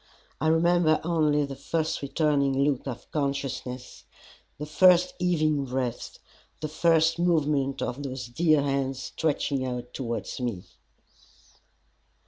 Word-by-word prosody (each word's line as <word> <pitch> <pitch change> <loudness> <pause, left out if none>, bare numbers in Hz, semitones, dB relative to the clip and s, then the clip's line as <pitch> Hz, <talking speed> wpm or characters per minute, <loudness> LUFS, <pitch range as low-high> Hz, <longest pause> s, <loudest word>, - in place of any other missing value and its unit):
I 155 - +1
remember 165 0 +3
only 155 -3 +2
the 140 -1 -7
first 160 +4 -2
returning 140 -2 +1
look 140 -2 0
of 120 -2 -7
consciousness, 135 -3 -4 0.5
the 150 - -5
first 180 +4 +4
heaving 155 -5 +1
breath, 125 -2 -4 0.4
the 155 - -3
first 165 +1 +2
movement 150 -6 +1
of 125 +3 -4
those 130 -3 -5
dear 155 +4 +2
hands 135 -1 -1
stretching 140 0 -1
out 125 -1 -5
towards 115 -4 -4
me. 120 -8 -3
145 Hz, 115 wpm, -27 LUFS, 130-160 Hz, 0.5 s, first